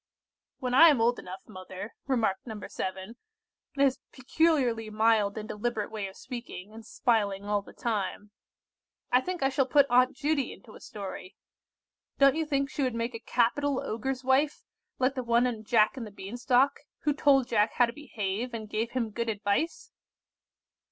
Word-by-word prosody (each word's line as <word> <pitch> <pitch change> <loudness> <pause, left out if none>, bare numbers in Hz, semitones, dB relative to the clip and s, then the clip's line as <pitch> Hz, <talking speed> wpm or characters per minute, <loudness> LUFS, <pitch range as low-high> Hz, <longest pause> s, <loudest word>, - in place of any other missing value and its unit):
"When 250 -2 -3
I 325 +6 +9
am 285 -6 +3
old 235 +2 +2
enough, 185 +1 -8
mother," 185 +2 -8
remarked 230 -6 0
No. 220 -2 -6
7, 190 +5 -5 0.6
in 280 - +2
his 270 -2 +2
peculiarly 260 -5 +1
mild 215 -1 +2
and 215 0 -5
deliberate 215 -1 -3
way 210 -3 -4
of 190 - -12
speaking, 235 -6 -8
and 225 0 -10
smiling 205 -4 0
all 205 0 0
the - - -14
time, 210 -2 -3 0.8
"I 250 - +5
think 360 0 -4
I 270 - +4
shall 270 -1 +1
put 285 +1 +5
Aunt 250 +1 +4
Judy 285 -2 0
into 220 - -15
a - - -12
story. 195 -2 -8 0.8
Don't 275 0 +5
you 320 -1 -1
think 275 -1 +1
she - - -3
would 255 -3 0
make 230 +1 -2
a 230 - -5
capital 260 +4 +1
Ogre's 260 +4 -3
wife, 270 +3 +2 0.3
like 260 +1 +2
the 260 - -3
one 235 0 +2
in 230 -3 -2
'Jack 215 0 +3
and 240 -5 -6
the - - -9
Bean 200 +2 -8
Stalk,' 255 +2 +2 0.2
who 295 - +1
told 275 -3 +3
Jack 215 -1 +2
how 245 - +4
to 235 - -6
behave, 235 -4 -4
and 220 -1 -6
gave 225 +3 -2
him 235 -4 -1
good 235 +2 -2
advice?" 225 - -1
235 Hz, 180 wpm, -29 LUFS, 215-265 Hz, 0.8 s, I